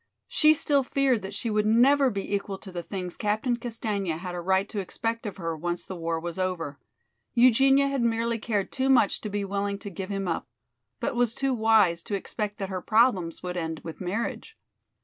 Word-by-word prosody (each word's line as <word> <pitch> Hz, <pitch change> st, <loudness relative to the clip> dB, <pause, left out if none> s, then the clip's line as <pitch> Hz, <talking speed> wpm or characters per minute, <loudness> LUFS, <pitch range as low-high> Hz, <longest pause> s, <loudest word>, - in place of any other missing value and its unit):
She 310 Hz, 0 st, +5 dB
still 290 Hz, -2 st, +3 dB
feared 265 Hz, -3 st, +1 dB
that 190 Hz, -, -6 dB
she 230 Hz, -, -2 dB
would 210 Hz, 0 st, +1 dB
never 265 Hz, +5 st, +5 dB
be 200 Hz, -2 st, -4 dB
equal 200 Hz, -1 st, -2 dB
to 190 Hz, -, -11 dB
the 175 Hz, -1 st, -4 dB
things 180 Hz, 0 st, -5 dB
Captain 220 Hz, +4 st, 0 dB
Castaigne 220 Hz, -5 st, -3 dB
had 175 Hz, +3 st, -3 dB
a 175 Hz, -, -4 dB
right 190 Hz, +3 st, +2 dB
to 210 Hz, -, -3 dB
expect 225 Hz, +4 st, -3 dB
of 205 Hz, -, -6 dB
her, 165 Hz, -3 st, -3 dB
once 175 Hz, +2 st, -3 dB
the 190 Hz, -, -6 dB
war 165 Hz, -1 st, -2 dB
was 170 Hz, +2 st, -5 dB
over. 170 Hz, -6 st, -2 dB, 0.6 s
Eugenia 270 Hz, +3 st, +5 dB
had 275 Hz, -2 st, -1 dB
merely 230 Hz, 0 st, 0 dB
cared 210 Hz, -3 st, -1 dB
too 265 Hz, 0 st, 0 dB
much 250 Hz, -7 st, +4 dB
to 215 Hz, -, -4 dB
be 205 Hz, 0 st, -2 dB
willing 200 Hz, 0 st, -2 dB
to 200 Hz, 0 st, -8 dB
give 185 Hz, +2 st, -6 dB
him 195 Hz, -1 st, -2 dB
up, 165 Hz, -, -2 dB, 0.5 s
but -, -, -1 dB
was 240 Hz, -1 st, +1 dB
too 270 Hz, -1 st, 0 dB
wise 220 Hz, -7 st, +4 dB
to 200 Hz, -, -3 dB
expect 205 Hz, +1 st, -4 dB
that 195 Hz, -1 st, -4 dB
her 185 Hz, -2 st, -3 dB
problems 210 Hz, -8 st, +2 dB
would 180 Hz, 0 st, -4 dB
end 160 Hz, -2 st, -3 dB
with 165 Hz, +2 st, -8 dB
marriage. 225 Hz, -, -3 dB
205 Hz, 210 wpm, -27 LUFS, 180-235 Hz, 0.6 s, She